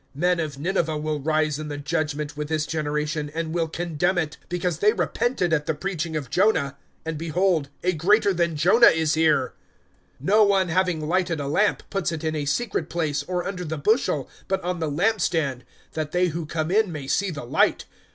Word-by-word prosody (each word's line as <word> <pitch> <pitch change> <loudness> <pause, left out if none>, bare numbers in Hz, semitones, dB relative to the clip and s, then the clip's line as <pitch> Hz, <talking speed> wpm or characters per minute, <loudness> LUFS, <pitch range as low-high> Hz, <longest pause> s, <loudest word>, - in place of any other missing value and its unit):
(32)Men 175 +1 +2
of 145 -3 -6
Nineveh 160 0 0
will 150 0 -2
rise 155 0 0
in 155 - -5
the 145 -1 -5
judgment 150 -1 -2
with 150 0 -4
this 155 -1 0
generation, 150 -1 -2
and 165 -1 -2
will 170 -1 0
condemn 175 +2 -1
it; 160 -2 -1
because 175 -2 -2
they 210 +3 +4
repented 210 -9 0
at 150 -2 0
the 160 - 0
preaching 170 -2 -3
of 140 -6 -4
Jonah; 180 -9 +2 0.3
and 160 -2 -3
behold, 165 -2 +1
a 180 +1 +2
greater 200 +5 +3
than 170 -2 0
Jonah 195 +10 +6
is 160 -1 +3
here. 155 -5 +2 0.7
(33)No 210 +3 +5
one, 190 -3 +2
having 175 -3 0
lighted 175 -2 0
a 140 - -3
lamp, 205 +9 +1
puts 195 -5 -1
it 160 -1 -5
in 160 0 -1
a 150 -2 -2
secret 165 +1 -1
place, 155 -4 -1
or 180 +4 -3
under 185 -2 -4
the 160 -1 -4
bushel, 150 - +1 0.2
but 190 0 0
on 180 0 -2
the 160 -2 -1
lamp 200 +8 +1
stand, 140 -9 0 0.3
that 155 -1 -3
they 180 0 +2
who 165 0 -4
come 155 +1 -2
in 210 -1 +3
may 150 -4 -6
see 195 +8 0
the 150 -7 -6
light. - - +2
160 Hz, 200 wpm, -24 LUFS, 150-180 Hz, 0.7 s, Jonah